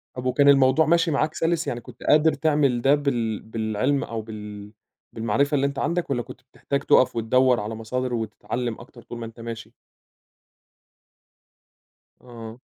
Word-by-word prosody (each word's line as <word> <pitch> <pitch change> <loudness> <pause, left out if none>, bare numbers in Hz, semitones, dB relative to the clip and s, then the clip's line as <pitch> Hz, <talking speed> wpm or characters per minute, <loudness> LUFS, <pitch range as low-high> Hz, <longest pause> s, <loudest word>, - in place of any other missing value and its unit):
طَب 125 0 -6
وكان 140 +3 +4
الموضوع 135 +3 +5
ماشي 170 0 +2
معاك 150 +2 0
سَلِس 165 -1 -1
يعني 120 -3 -3
كُنت - - -13
قادر 155 +1 +4
تعمل 145 -5 +1
ده 135 +3 +5
بال 120 -7 -1
بالعِلم 110 +5 -1
أو 115 -1 -5
بال 105 -1 -9 0.4
بالمعرفة 120 +7 0
اللي 140 - +2
أنت 140 0 -2
عندك، 170 +3 -1
والّا 125 -3 0
كُنت - - -11
بتحتاج 140 - -2
تُقف 130 - +4
وتدوّر 125 +2 +3
على 105 +2 -4
مصادر 125 +3 -3
وتتعلّم 115 +1 -4
أكتر 120 - -14
طول 120 - -9
ما 115 - -6
أنت 115 +1 -12
ماشي؟ 115 -1 -8 2.5
آه. 120 -1 -11
125 Hz, 155 wpm, -24 LUFS, 115-140 Hz, 2.5 s, الموضوع